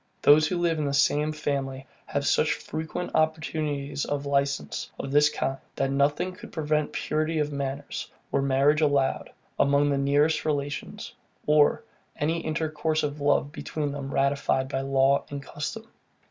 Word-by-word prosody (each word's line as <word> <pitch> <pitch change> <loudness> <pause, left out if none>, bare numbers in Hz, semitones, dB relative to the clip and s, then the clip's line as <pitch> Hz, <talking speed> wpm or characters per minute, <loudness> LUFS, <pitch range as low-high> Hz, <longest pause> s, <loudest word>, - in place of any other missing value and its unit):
Those 155 +1 +7
who 180 - -1
live 170 -2 +1
in 150 - 0
the 140 0 0
same 145 +1 +3
family 135 -3 -3 0.2
have 140 0 -2
such 155 - +3
frequent 160 +3 -5
opportunities 155 -3 -1
of 145 0 -2
licence 140 0 -1
of 135 - -5
this 150 +1 +5
kind, 135 -2 -2 0.2
that 135 0 0
nothing 145 +6 +1
could 180 - -12
prevent 150 -2 0
purity 155 +1 -1
of 150 -1 0
manners, 140 0 -4 0.2
were 140 - +2
marriage 140 +3 +3
allowed, 140 -3 +1 0.3
among 140 +1 +3
the 140 - +1
nearest 145 +3 +2
relations, 145 -2 -3 0.3
or 150 -1 +4 0.3
any 160 +2 0
intercourse 155 -1 -1
of 145 0 -3
love 145 0 +2
between 150 -1 -3
them 140 -1 -5
ratified 135 -1 +1
by 135 -1 -1
law 135 0 +3
and 140 -1 -6
custom. 220 +12 -6
145 Hz, 155 wpm, -26 LUFS, 140-155 Hz, 0.3 s, Those